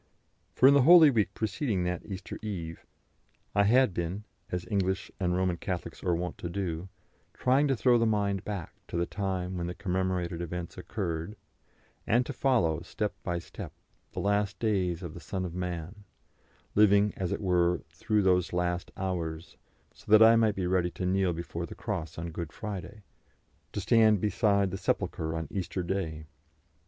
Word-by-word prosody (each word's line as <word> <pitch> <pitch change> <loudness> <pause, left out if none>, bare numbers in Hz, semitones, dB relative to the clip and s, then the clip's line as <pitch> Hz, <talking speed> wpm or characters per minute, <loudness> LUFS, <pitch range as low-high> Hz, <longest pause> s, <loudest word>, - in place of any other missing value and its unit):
For 130 - +6
in 140 - +8
the 140 - +6
Holy 160 +1 +8
Week 110 -6 +1
preceding 110 -2 -1
that 90 -1 -2
Easter 95 -2 -7
Eve, 85 -7 -6 0.7
I 100 0 +4
had 125 -1 +4
been 85 +4 -3 0.3
as 90 -1 -3
English 95 -1 -1
and 90 -2 +1
Roman 90 -2 +1
Catholics 90 0 -5
are 90 -2 +2
wont 90 +1 -4
to 85 - -4
do 90 -1 -3 0.5
trying 135 +3 +3
to 135 - +2
throw 120 0 +4
the 115 - +3
mind 100 -3 0
back 100 -6 -5
to - - -4
the 85 - +1
time 95 -2 -3
when 85 - -2
the 90 - -5
commemorated 90 -2 -1
events 85 0 -5
occurred, 85 +5 -4 0.7
and 120 +3 +3
to 145 - -5
follow, 105 - +2
step 105 +4 -3
by 85 -1 -2
step, 85 - -8 0.4
the - - -4
last 100 0 +1
days 95 -5 0
of 85 -3 -6
the 90 - -9
Son 95 +1 -4
of 85 - -5
Man, 90 +2 -5 0.7
living, 105 0 +5
as 95 -3 -3
it - - -1
were, 90 -3 +2
through 105 -1 0
those 90 -2 +2
last 90 0 -1
hours, 85 -4 -4 0.4
so - - -12
that 110 +1 +9
I 115 +1 +8
might 110 -3 +3
be 95 - -2
ready 90 -1 +1
to 90 - -5
kneel 95 0 +2
before 85 0 -5
the - - -9
cross 85 -7 -4
on 85 +1 -4
Good 85 -1 -5
Friday, 105 +1 -7 0.7
to - - -3
stand 110 -3 +4
beside 100 -1 +2
the 95 - -4
sepulchre 80 -4 -1
on 80 -1 -3
Easter 95 -1 -3
Day. 85 -4 -3
95 Hz, 175 wpm, -29 LUFS, 85-105 Hz, 0.7 s, that